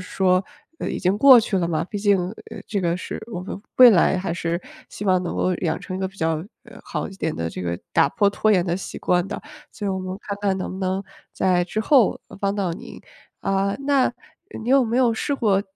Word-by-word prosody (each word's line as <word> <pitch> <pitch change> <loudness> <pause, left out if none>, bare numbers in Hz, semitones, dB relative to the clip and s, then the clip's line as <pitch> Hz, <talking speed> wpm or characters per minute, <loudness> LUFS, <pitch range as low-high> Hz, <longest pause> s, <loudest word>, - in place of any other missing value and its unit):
说 185 -1 +2 0.5
已 - - -3
经 185 +3 +1
过 265 -1 +9
去 205 -4 0
了 170 -1 0
嘛， 160 0 0
毕 205 +2 -5
竟， 205 -1 +3 0.3
呃， 225 - -8
这 200 -3 -2
个 170 -1 0
是 - - -6
我 180 -4 -5
们 195 - -7 0.2
未 250 -2 +10
来 190 -1 +4
还 185 -2 -2
是 170 0 -2 0.3
希 - - -7
望 185 -2 +3
能 175 - -4
够 185 - +1
养 160 -2 -1
成 185 - -7
一 185 - -4
个 190 - -1
比 195 - -19
较， 160 -3 0 0.3
呃， - - -14
好 - - -4
一 195 - -10
点 160 -4 -2
的 85 0 -3
这 - - -7
个 85 -1 -3
打 - - +4
破 200 +6 +2
拖 215 +2 +1
延 185 -4 +3
的 170 -1 0
习 190 - -6
惯 180 +1 +1
的， 200 - -5 0.3
所 210 - -7
以 - - 0
我 190 - -2
们 185 0 -5
看 200 - -4
看 195 -2 +1
能 185 - -4
不 190 - -7
能 190 +1 -1 0.3
在 180 -2 +2
之 215 +4 -3
后 250 -3 +4 0.2
帮 200 0 0
到 195 -4 -1
您。 235 +9 -9 0.4
啊， 195 0 0
那 275 -3 +3 0.5
你 225 - -6
有 270 0 +5
没 230 +2 -1
有 240 -3 +3
试 285 - -2
过 210 -7 +2
190 Hz, 255 characters per minute, -23 LUFS, 180-210 Hz, 0.5 s, 未